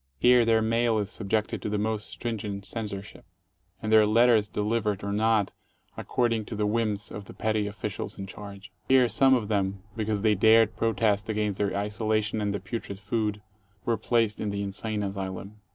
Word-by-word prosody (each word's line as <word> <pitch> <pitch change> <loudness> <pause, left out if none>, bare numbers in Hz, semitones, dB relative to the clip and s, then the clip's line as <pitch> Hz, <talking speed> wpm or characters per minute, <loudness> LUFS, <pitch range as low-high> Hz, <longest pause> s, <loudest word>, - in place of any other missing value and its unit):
Here 125 - +5
their 110 -1 +3
mail 115 0 +2
is 105 -1 -2
subjected 110 0 -2
to - - -3
the 105 - -1
most 110 0 -2
stringent 105 -4 -4
censorship, 105 -3 -6 0.6
and 110 0 0
their 110 -1 +7
letters 115 -1 +4
delivered 105 -1 -1
or 100 - -2
not, 110 -1 +2 0.4
ac - - -7
cording 115 -2 +1
to 110 - -6
the 105 0 0
whims 105 -1 -1
of 105 - -7
the - - -12
petty 110 -1 0
officials 100 -2 -5
in 95 - -5
charge. 100 0 -10 0.2
Here 130 -2 +6
some 130 +4 +5
of 115 -5 -1
them, 100 -2 -1
because 110 -2 -2
they 110 -1 +4
dared 110 +2 +5
protest 110 -1 +1
against 105 -2 -1
their 100 -1 0
isolation 110 +1 -1
and 105 -1 0
the 100 - -2
putrid 100 +1 -6
food, 105 0 -2 0.4
were 115 - +2
placed 115 0 +1
in 105 - -1
the 100 0 -2
insane 105 +1 -3
asylum. 100 +1 -5
105 Hz, 185 wpm, -27 LUFS, 100-110 Hz, 0.6 s, their